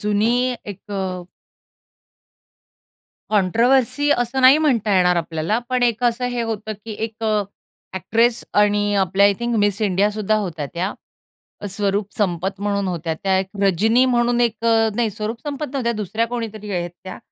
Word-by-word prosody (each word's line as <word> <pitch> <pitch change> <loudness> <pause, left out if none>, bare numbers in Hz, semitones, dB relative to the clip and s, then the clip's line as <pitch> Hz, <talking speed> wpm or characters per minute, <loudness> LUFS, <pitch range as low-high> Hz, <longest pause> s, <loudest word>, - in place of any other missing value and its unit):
जुनी 230 +5 +1
एक 200 -3 -7
अ 195 - -2 2.3
कॉन्ट्रोव्हर्सी 235 +8 +2
असं 245 -1 +1
नाही 260 +3 +7
म्हणता 235 -10 +1
येणार 180 -1 +3
आपल्याला. 165 +5 -1
पण 255 -1 0
एक 240 0 +1
असं 240 +1 +1
हे 240 -1 -2
होतं, 220 -1 -4
की 225 - -6
एक 225 0 -8
अ, 215 -1 +2 0.5
एक्ट्रेस 230 +6 +1
आणि 205 0 +2
आपल्या 190 +1 +3
आय 205 - +4
थिंक 235 0 -1
मिस 205 0 +1
इंडिया 200 +1 +2
सुद्धा 215 0 -1
होत्या 170 -8 -3
त्या, 185 +4 -2 0.8
स्वरूप 200 +1 -1
संपत 190 0 -1
म्हणून 200 -1 -1
होत्या 170 -2 -3
त्या. 190 +3 0
एक 190 - -1 0.2
रजनी 220 +7 +3
म्हणून 240 -1 +2
एक 230 -1 0
अ 225 -1 +4
नाही, 230 -3 +1
स्वरूप 215 +3 -5
संपत 295 0 -4
नव्हत्या 240 -4 0
दुसऱ्या 215 +2 -2
कोणीतरी 220 -3 -5
आहेत 175 -1 -2
त्या. 185 - -8
215 Hz, 155 wpm, -21 LUFS, 195-235 Hz, 2.3 s, नाही